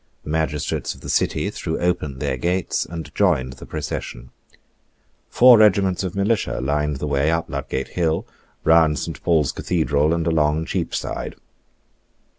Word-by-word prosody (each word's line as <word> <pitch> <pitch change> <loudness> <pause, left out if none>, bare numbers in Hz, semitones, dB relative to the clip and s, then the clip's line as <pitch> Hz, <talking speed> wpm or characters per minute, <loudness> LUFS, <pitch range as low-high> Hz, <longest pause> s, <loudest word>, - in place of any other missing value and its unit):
The 75 - -6
magistrates 80 -2 -1
of - - -17
the - - -4
City - - 0
threw 80 - -3
open 85 -6 -1
their 65 - -1
gates 90 +7 -1
and 80 -3 -8
joined 75 -11 +1
the 65 - -12
procession. - - -5 1.0
Four 125 -2 +7
regiments 95 -3 +3
of 95 -1 -4
militia 100 - 0
lined 75 +2 -1
the 75 - -4
way 70 +1 +1
up 80 0 0
Ludgate 70 -2 -3
Hill, 80 -2 -1 0.4
round 80 -2 +4
Saint 80 -5 -5
Paul's 80 -5 +2
Cathedral, 75 0 0
and 85 -1 0
along 80 -1 +1
Cheapside. - - -3
80 Hz, 145 wpm, -22 LUFS, 70-85 Hz, 1.0 s, Four